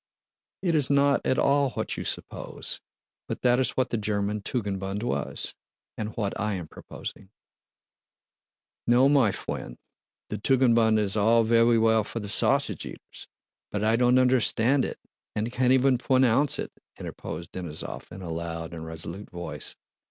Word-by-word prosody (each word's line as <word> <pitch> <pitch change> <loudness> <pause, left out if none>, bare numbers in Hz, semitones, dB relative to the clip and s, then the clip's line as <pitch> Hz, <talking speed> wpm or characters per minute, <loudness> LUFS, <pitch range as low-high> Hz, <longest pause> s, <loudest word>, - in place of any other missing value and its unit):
"It 175 -3 +2
is 150 -4 +2
not 140 0 +4
at 130 - +2
all 140 0 +3
what - - -3
you - - -4
suppose; - - -5 0.5
but - - -5
that 125 0 +4
is 130 - 0
what 130 - +1
the 115 - 0
German 105 0 -1
Tugendbund 100 -2 -3
was, 120 - -2 0.4
and 105 -1 -3
what 100 -3 -1
I 105 -1 0
am 90 -4 -5
proposing." 95 - -9 1.6
"No, 125 +3 +5
my 140 -6 +4
fwiend! - - -5 0.5
The - - -4
Tugendbund 115 -2 +4
is 105 -2 +1
all 115 +2 +4
vewy 115 0 +4
well 110 -1 +4
for 115 - -5
the 105 -2 -5
sausage - - +1
eaters, - - -10 0.4
but 105 0 -2
I 110 +1 +3
don't 125 +1 +4
understand 130 +1 +3
it - - -5 0.4
and 110 +3 -1
can't 125 0 +2
even 130 -1 +4
pwonounce 130 +1 +3
it," - - -4 0.3
interposed 85 0 -7
Denísov 85 -4 -6
in 95 - -8
a 85 -2 -4
loud 85 0 -5
and 80 -1 -6
resolute 80 +5 -5
voice. 85 -4 -5
110 Hz, 155 wpm, -27 LUFS, 100-130 Hz, 1.6 s, No